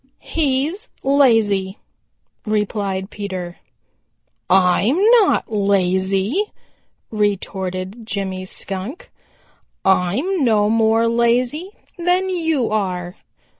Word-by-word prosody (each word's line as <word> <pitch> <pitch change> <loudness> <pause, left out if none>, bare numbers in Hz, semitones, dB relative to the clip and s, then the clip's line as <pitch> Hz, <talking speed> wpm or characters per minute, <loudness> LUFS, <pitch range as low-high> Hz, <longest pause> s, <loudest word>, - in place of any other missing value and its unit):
"He's 315 - -1
lazy," 225 -8 +3 0.7
replied 205 -2 -2
Peter. 185 -4 -6 0.9
"I'm 190 - +3 0.2
not 400 - +1
lazy," 195 - +1 0.7
retorted 195 -1 -2
Jimmy 190 -3 -3
Skunk. 195 - -7 0.7
"I'm 200 - +1
no 215 -3 +3
more 225 0 +3
lazy 240 +8 +1 0.3
than 360 +2 +1
you 320 -10 0
are. 180 -4 -2
210 Hz, 75 wpm, -20 LUFS, 190-265 Hz, 0.9 s, lazy